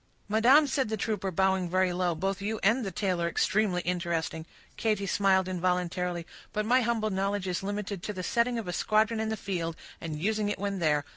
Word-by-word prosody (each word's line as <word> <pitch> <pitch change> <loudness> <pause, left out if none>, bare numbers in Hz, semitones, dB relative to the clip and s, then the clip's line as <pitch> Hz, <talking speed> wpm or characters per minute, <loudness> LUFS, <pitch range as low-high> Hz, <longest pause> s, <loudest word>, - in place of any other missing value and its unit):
"Madam," 240 +8 +5
said 270 -4 0
the 220 - -1
trooper, 205 -2 -1
bowing 190 0 +1
very 185 0 +2
low, 175 -1 0
"both 195 +4 -2
you 215 +2 -2
and 230 +6 +3
the 195 - -2
tale 185 -1 -1
are 170 - +1
extremely 190 0 +1
interesting"—Katy 175 +4 -2
smiled 190 -1 +2
involuntarily—"but 180 +2 -2
my 250 +3 +4
humble 225 -2 0
knowledge 195 0 -1
is 180 -1 -1
limited 200 -1 -4
to 210 - -4
the 185 -2 -5
setting 235 +4 +1
of 225 -5 -4
a 180 - -3
squadron 220 +4 +2
in 220 0 -1
the 220 - -2
field, 175 -5 -3 0.3
and 155 -2 -4
using 210 +3 0
it 205 - -2
when 200 0 -2
there. 150 -3 +2
195 Hz, 195 wpm, -29 LUFS, 180-215 Hz, 0.3 s, Madam